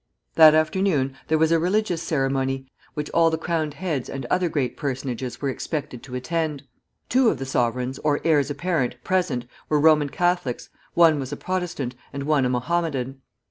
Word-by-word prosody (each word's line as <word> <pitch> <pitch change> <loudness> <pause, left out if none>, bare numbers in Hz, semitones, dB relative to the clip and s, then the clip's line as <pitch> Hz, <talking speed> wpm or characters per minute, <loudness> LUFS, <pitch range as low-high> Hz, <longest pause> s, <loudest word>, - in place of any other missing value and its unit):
That 155 -1 +8
afternoon 155 -4 +1
there 160 - +2
was 160 +1 +3
a 165 - +4
religious 180 0 0
ceremony, 135 -3 -1 0.3
which 150 0 -4
all 165 -1 +4
the 160 - -1
crowned 160 -3 -2
heads 155 -5 -3
and 135 -2 -5
other 180 -1 +2
great 135 -6 -1
personages 130 -2 -4
were 140 - +1
expected 135 -2 -4
to 125 -2 -8
attend. 150 +2 -2 0.4
Two 255 -1 +4
of - - -1
the 135 - -5
sovereigns 125 +1 -1
or 150 -1 +1
heirs 150 -4 +3
apparent 155 -4 -1
present 175 -10 0 0.2
were 150 - +3
Roman 150 -1 +4
Catholics, 175 -6 -1 0.3
one 165 -3 +5
was 135 0 -5
a 145 - -4
Protestant, 175 -9 -3 0.2
and 140 0 -5
one 145 -2 +2
a - - +1
Mohammedan. 135 -1 -1
150 Hz, 175 wpm, -24 LUFS, 135-165 Hz, 0.4 s, That